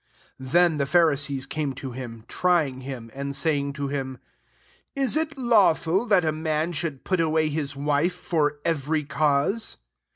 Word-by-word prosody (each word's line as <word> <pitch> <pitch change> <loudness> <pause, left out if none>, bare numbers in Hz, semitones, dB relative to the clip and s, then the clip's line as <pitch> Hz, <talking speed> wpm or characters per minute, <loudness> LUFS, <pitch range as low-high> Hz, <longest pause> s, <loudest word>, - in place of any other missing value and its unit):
3 130 - -8
Then 170 +1 +4
the 140 - 0
Pharisees 145 -4 +2
came 145 0 -2
to 130 0 -7
him, 120 -3 -8
trying 160 -8 +1
him, 125 -4 -7
and 140 0 -4
saying 140 -2 0
\£o 140 -1 -3
/tim,'] 135 -2 -4 0.5
*' - - -35
Is 260 - +1
it 310 -2 -1
lawful 205 -4 +3
that 195 -6 +4
a 155 - +2
man 155 +1 -1
should 155 -4 -4
put 185 -2 0
away 160 -1 +2
his 145 -2 -3
wife 145 +5 +1
for 150 -4 0
every 155 -1 0
cause? 145 +8 0
150 Hz, 165 wpm, -25 LUFS, 140-170 Hz, 0.5 s, Then